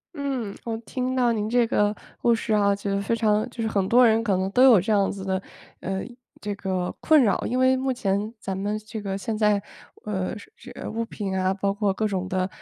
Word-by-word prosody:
嗯， 265 -8 -3
我 225 -1 -3
听 255 +3 -3
到 245 -2 +3
您 215 -1 -1
这 240 0 +3
个 210 -2 +1 0.3
故 235 -1 +4
事 225 -1 -2
啊， 200 -1 +3
觉 200 0 -7
得 200 0 0
非 230 +3 0
常 215 0 +1
就 230 -1 -5
是 220 - 0
很 195 -3 0
多 245 +1 +6
人 225 0 +3
可 195 -5 +1
能 190 +1 -1
都 250 +5 +4
有 250 -6 +8
这 215 +5 0
样 200 -1 +2
子 195 -1 -7
的， 190 0 -1 0.4
呃， 190 0 -3 0.4
这 205 -1 -4
个 185 -2 -3
困 310 -4 +5
扰。 205 - +1
因 250 - -1
为 260 0 +4
目 260 +1 -1
前 210 -3 -1
咱 190 -1 -4
们 205 +2 -2
这 215 +1 -7
个 195 -1 -3
现 220 +2 -3
在， 210 -1 +3 0.5
呃， 190 -3 -2 0.2
这 - - -9
物 230 +1 -2
品 200 -4 -4
啊， 185 0 +1
包 200 0 0
括 205 -1 0
各 215 +3 -1
种 185 -2 -3
的 185 0 0
210 Hz, 245 characters per minute, -25 LUFS, 195-230 Hz, 0.5 s, 有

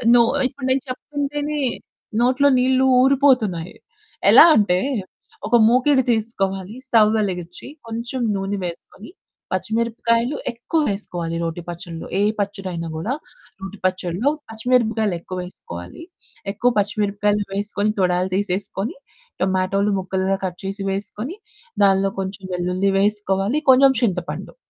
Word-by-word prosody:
No. 240 - +7 0.3
ఇప్పుడు 265 0 -8
నేను 260 0 +2
చెప్తుంటేనే 290 +2 -3 0.6
నోట్లో 255 +4 +3
నీళ్ళు 260 +1 +3 0.2
ఊరిపోతున్నాయి. 255 - +2 0.6
ఎలా - - +10
అంటే. 185 -4 +3 0.7
ఒక 240 - +3
మూకిడి 260 +2 +4
తీసుకోవాలి. 195 -3 -2
స్టవ్ 215 -3 +5
వెలిగించి. 180 -3 -3 0.2
కొంచెం 235 +3 -4
నూనె 195 +1 -2
వేసుకొని. 175 - -9 0.4
పచ్చిమిరపకాయలు 230 +3 0 0.2
ఎక్కువ 240 +7 -2
వేసుకోవాలి 175 -5 -4
రోటి 165 +1 -3
పచ్చడిలో. 170 -1 -7
ఏ - - +3 0.2
పచ్చడి 195 -2 -3
అయినా 170 -1 -4
కూడా 190 +11 -2 0.5
రోటి 195 +1 -7
పచ్చడిలో 185 +6 0 0.2
పచ్చిమిరపకాయలు 225 -3 +1
ఎక్కువ 185 +2 -7
వేసుకోవాలి. 90 - -10 0.5
ఎక్కువ 240 +5 +1
పచ్చిమిరపకాయలు 205 0 0
వేసుకొని 205 +1 -1
తొడాలు 180 0 +1
తీసేసుకొని, 200 +2 -2 0.5
టొమాటోలు 190 +2 +1
ముక్కలుగా 190 +1 -1
కట్ 180 -1 -5
చేసి 195 +1 -4
వేసుకొని. 210 - -5 0.5
దానిలో 195 0 +3
కొంచెం 190 +1 -5
వెల్లుల్లి 180 +2 0
వేసుకోవాలి. 205 +4 +1
కొంచెం 265 +1 +6
చింతపండు. 180 -7 -2
205 Hz, 115 wpm, -21 LUFS, 185-240 Hz, 0.7 s, ఎలా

